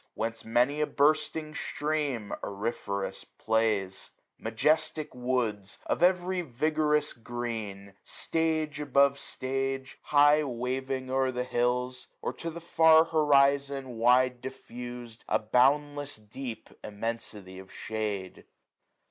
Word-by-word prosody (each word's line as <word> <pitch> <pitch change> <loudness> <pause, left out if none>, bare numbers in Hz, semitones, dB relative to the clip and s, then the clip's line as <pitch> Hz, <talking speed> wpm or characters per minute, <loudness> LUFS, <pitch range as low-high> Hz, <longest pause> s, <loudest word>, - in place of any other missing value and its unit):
Whence 115 0 -3
many 125 +6 +2
a 150 - +2
bursting 155 +1 +1
stream 145 -9 -2
auriferous 100 -1 -3
plays: 110 -4 -1 0.3
Majestic 155 0 0
woods, 120 -6 -2
of - - -1
every 180 0 +3
vigorous 150 +1 +1
green. 110 -5 -5
Stage 160 -2 -1
above 140 -1 +3
stage, 135 0 -3
high 145 +1 +5
waving 130 0 -3
o*er 130 0 +2
the 125 0 -2
hills; 125 +1 -1 0.2
650 - - -4
Or - - 0
to 165 - -5
the 170 +1 -8
far 160 -1 +6
horizon 140 -4 +2
wide 125 +1 +4
difFusM 120 -3 -8
A - - +4
boundless 145 +5 +2
deep 110 +3 -8
immensity 105 -3 -5
of 95 - -12
shade. 105 -4 -4
130 Hz, 110 wpm, -29 LUFS, 115-150 Hz, 0.3 s, far